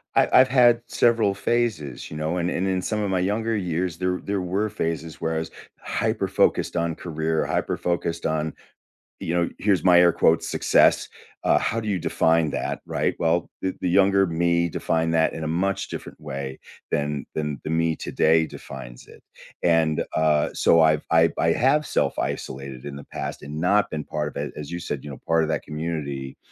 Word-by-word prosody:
I - - +5
I've 130 0 +7
had 120 -2 +5
several 115 -4 +2
phases, 100 - -2
you 75 - -6
know? 80 +3 -2
And 85 0 0
and 95 - -1
in 95 -1 0
some 105 +2 -2
of 100 - -1
my 95 -1 +1
younger 110 +4 0
years, 90 -2 -2
there 90 0 -1
there 100 -1 -1
were 95 +4 -1
phases 80 -5 -4
where 80 0 -1
I - - 0
was 80 - -5 0.3
hyper - - -1
focused - - +1
on 85 -2 0
career, 80 -1 -2
hyper - - -1
focused 85 -1 -2
on, 80 -1 -1 0.7
you 85 - -3
know, 85 -1 +1
here's 100 -3 +2
my 90 -1 +6
air 90 -1 +6
quotes, 80 - +2
"Success," - - +3 0.3
uh, - - +4
how 115 - 0
do 110 - -6
you 95 -3 0
define 80 -2 +2
that, - - -3
right? - - -1
Well, 85 +1 +1
the 95 0 -2
the 90 - 0
younger 95 +1 +4
me 85 0 +1
define 80 +1 0
that 80 -1 +2
in 80 - -5
a - - -2
much 95 +5 -1
different - - -8
way 70 -1 -6 0.3
than 75 -1 -1
than 75 -3 -2
the - - -3
me 80 0 +1
today 80 +1 +2
defines - - -10
it, - - -16 0.4
and, 80 -2 +2
uh, 75 -1 +2
so, 85 - +4
I've 80 -1 +3
I 80 0 +5
I 80 - +2
have 140 - +2
self-isolated 65 - -3
in 70 -1 -6
the 70 - -8
past - - -6
and 75 +2 -6
not 100 +5 +2
been 75 -1 -4
part 75 -1 -3
of - - -16
it 75 -1 -5
as 75 0 -7
you 85 - -3
said, 75 -5 -5
you 75 - -8
know, 70 - -8
part 80 0 +3
of 80 - -2
that - - -1
community, 75 -4 -4
85 Hz, 200 wpm, -24 LUFS, 75-95 Hz, 0.7 s, I've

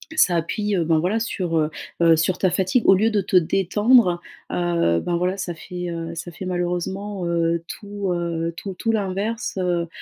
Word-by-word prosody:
ça 180 - +4
appuie, 205 +5 -1
heu, 170 - +1
ben 160 -1 +3
voilà 190 +7 0
sur, 185 -7 -2
heu, 155 -1 +2 0.3
heu, 165 -1 +6
sur 160 +3 +1
ta 185 - +2
fatigue. 190 +6 +1
Au 195 - +9
lieu 220 +4 +2
de 210 - +2
te 190 0 -3
détendre, 195 +2 +4 0.3
heu, 170 - +1
ben, 175 -1 -1
voilà, 180 +2 0
ça 185 -2 -3
fait, 180 +1 -6
heu, 165 0 -5
ça 175 +1 -6
fait 170 +4 -8
malheureusement, 180 +2 -2
heu, 170 0 +1
tout, 205 -2 -4
heu, 170 -1 -2
tout 195 +1 -6
tout 225 +5 -1
l'inverse, 205 +2 -2
heu 175 -2 0
180 Hz, 190 wpm, -22 LUFS, 170-195 Hz, 0.3 s, Au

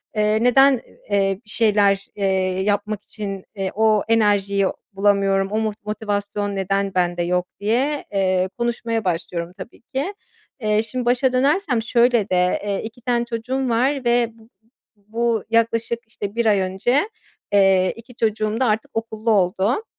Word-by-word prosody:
eee, 215 +1 +2
neden, 265 +1 +5 0.3
eee, 195 -1 +1
bir - - -15
şeyler, 205 -3 +2
eee, 190 -2 0
yapmak 205 0 -1
için, 195 -3 -6
eee, 195 -2 -2
o 215 -1 +3
enerjiyi 205 -3 +2 0.3
bulamıyorum, 195 -1 +2
o 215 - 0
mot 215 -1 -4
motivasyon 205 -1 -2
neden 195 0 -1
bende 175 -1 +1
yok?" 180 +1 0
diye, 255 +8 0
eee, 185 -1 +1
konuşmaya 235 -2 -2
başlıyorum 170 0 -3
tabii 185 +3 -10
ki. 280 +10 -4 0.5
Eee, 215 -1 +2
şimdi 245 +2 -2
başa 250 +1 +2
dönersem 275 - +2
şöyle 235 -2 +2
de: 180 0 +1
Eee, 200 -1 -1
2 230 +3 -9
tane 240 -1 0
çocuğum 245 +3 -2
var 255 +3 +1
ve 240 -1 +2
bu 220 - -19 0.6
bu 230 0 0
yaklaşık 230 0 +1
işte, 205 -2 -6
1 235 -1 0
ay 205 -2 +4
önce, 195 - 0 0.4
eee, 190 -2 +4
2 230 +2 -14
çocuğum 215 -1 0
da 260 - +2
artık 220 -1 0
okullu 225 0 -2
oldu. 195 - +1
215 Hz, 150 wpm, -21 LUFS, 195-235 Hz, 0.6 s, neden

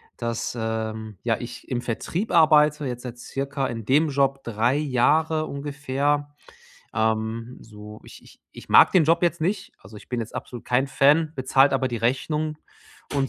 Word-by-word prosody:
dass, 115 0 -3
ähm, 110 -1 -4
ja, 115 -1 +1
ich 120 0 -9
im 120 -2 -2
Vertrieb 165 - -3
arbeite, 150 -3 +4
jetzt 125 -2 -5
seit 125 -1 -7
circa 135 +2 -3
in 115 -2 -5
dem 150 +6 +3
Job 135 -1 0
3 115 +4 +1
Jahre 155 +3 +1
ungefähr. 145 0 -2 0.6
Ähm, 110 +2 -1
so, 105 -1 -12
ich - - -14
ich - - -19
ich - - -13
mag - - +7
den 180 -4 +5
Job 165 +2 +3
jetzt 170 -1 +1
nicht, 195 +4 -2
also 105 +3 -14
ich - - -14
bin 125 -2 -2
jetzt 115 - -6
absolut 120 -2 -7
kein 125 +3 +1
Fan, 150 +4 +3
bezahlt 135 +1 +3
aber 135 -1 +1
die 120 - -3
Rechnungen 150 +6 -1 0.6
und 140 -2 0
135 Hz, 170 wpm, -24 LUFS, 115-150 Hz, 0.6 s, mag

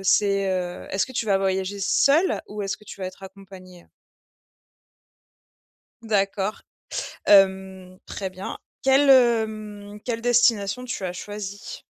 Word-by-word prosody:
c'est, 195 +1 +3
heu 180 -1 -3
est-ce 190 - 0
que 260 - -11
tu 235 - -1
vas 200 -3 +2
voyager 190 +1 -1
seul 300 - +3
ou 210 0 -6
est-ce 195 0 -2
que - - -20
tu 200 - -11
vas 185 - -3
être 185 +1 -10
accompagné? 190 -2 -13 2.2
D'accord. 205 -2 -1 0.6
Hem, 190 -2 +3
très 195 -2 -5
bien. 185 +1 -7 0.2
Quelle, 270 +1 +4
hem, 215 -5 +2
quelle 230 -2 -3
destination 235 -2 +2
tu 245 -6 -5
as 180 - -3
choisi? 200 +1 -7
200 Hz, 130 wpm, -24 LUFS, 190-220 Hz, 2.2 s, Quelle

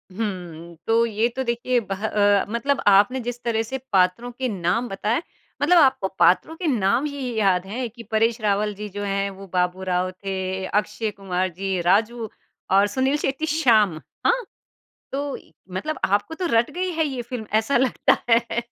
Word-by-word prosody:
हुँ, 175 -6 -5
तो 230 +1 +4
ये 225 +1 +1
तो 265 - -1
देखिए 240 +1 0
बह 195 +2 -3
अ, 205 -1 +3
मतलब 250 +5 0
आपने 205 +7 +5
जिस 240 +1 -5
तरह 225 -1 0
से 265 +4 -4 0.2
पात्रों 190 +6 +2
के 255 +1 -3
नाम 190 +5 0
बताएँ, 210 +8 -1 0.4
मतलब 345 +4 +5
आपको 265 -10 +4
पात्रों 320 - +4
के 345 -1 -3
नाम 235 +1 +2
ही 275 -4 -4
याद 190 -3 +2
है 240 +4 -3
कि 230 +1 -12
परेश 225 +2 +2
रावल 210 0 +1
जी 210 +1 -6
जो 205 +1 -5
हैं, 200 0 -1
वो 195 0 -11
बाबू 180 +1 0
राव 180 +1 0
थे, 190 0 -4
अक्षय 210 +2 -1
कुमार 185 -2 -2
जी, 190 0 -2
राजू 220 +5 +1 0.4
और 200 +1 +5
सुनील 265 +6 +1
शेट्टी 280 +2 -2
श्याम। 215 - +4 0.3
हाँ? - - +3 0.7
तो 280 0 -2 0.4
मतलब 310 +11 -3
आपको 205 +11 0
तो 360 +1 -3
रट 230 +1 +3
गई 365 +1 -2
है 320 -1 +1
ये 260 -3 -4
फ़िल्म 235 -2 -6
ऐसा 220 +5 +2
लगता 260 +1 +3
है? 235 0 +2
220 Hz, 175 wpm, -23 LUFS, 195-250 Hz, 0.7 s, आपने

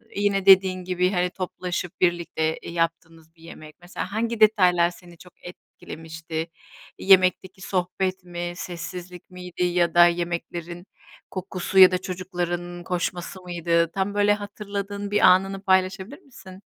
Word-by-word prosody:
yine 200 -1 0
dediğin 190 -1 +5
gibi, 180 0 0
hani, 180 -2 0
toplaşıp 180 -1 -5
birlikte, 170 -3 0
eee, - - -8
yaptığınız 165 -1 -4
bir 165 - -21
yemek? 155 -2 -12
Mesela 180 +1 -6
hangi 230 +2 -2
detaylar 180 -5 +4
seni 175 -1 -16
çok 180 +1 -17
etkilemişti? 160 -2 -8 0.5
Yemekteki 185 0 +3
sohbet 185 0 -2
mi? 175 0 -5
Sessizlik 180 0 -8
miydi? 180 -1 -6
Ya 175 -1 +1
da 175 0 +7
yemeklerin 175 0 -4 0.5
kokusu 190 0 -2
ya 185 -1 +9
da 185 - +1
çocukların 175 -1 -5
koşması 180 +1 -4
mıydı? 170 -2 0
Tam 195 +2 -2
böyle 205 0 +3
hatırladığın 205 -1 -6
bir 205 - +2
anını 195 +1 +4
paylaşabilir 190 - 0
misin? 195 - -14
180 Hz, 130 wpm, -24 LUFS, 175-190 Hz, 0.5 s, ya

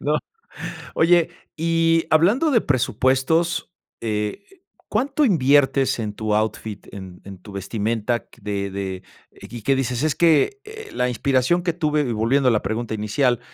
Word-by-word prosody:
¿no? 150 +1 +1 0.8
Oye, 170 0 +4 0.3
y 165 0 +2
hablando 210 - +3
de 230 -5 +4
presupuestos, 145 +7 +1 0.3
eh, 105 - -3 0.4
¿cuánto 275 +7 +1
inviertes 140 - +3
en 105 -2 -3
tu 110 0 -2
outfit, 110 -1 -3
en 95 -2 -9
en 95 -1 -9
tu 100 - -13
vestimenta 110 +4 -2
q - - -21
de 100 -1 -3
de, 95 -1 -5 0.3
y 120 -2 -10
que 135 +4 +2
dices: 125 0 -1
"Es 155 - +1
que, 170 - +3
eh, 440 0 -10
la 125 0 0
inspiración 130 +7 +1
que 170 -2 0
tuve"?, 150 -6 0
volviendo 125 +5 +2
a - - +3
la 110 - +1
pregunta 110 0 -3
inicial, 110 +4 +1
130 Hz, 150 wpm, -22 LUFS, 110-165 Hz, 0.8 s, Oye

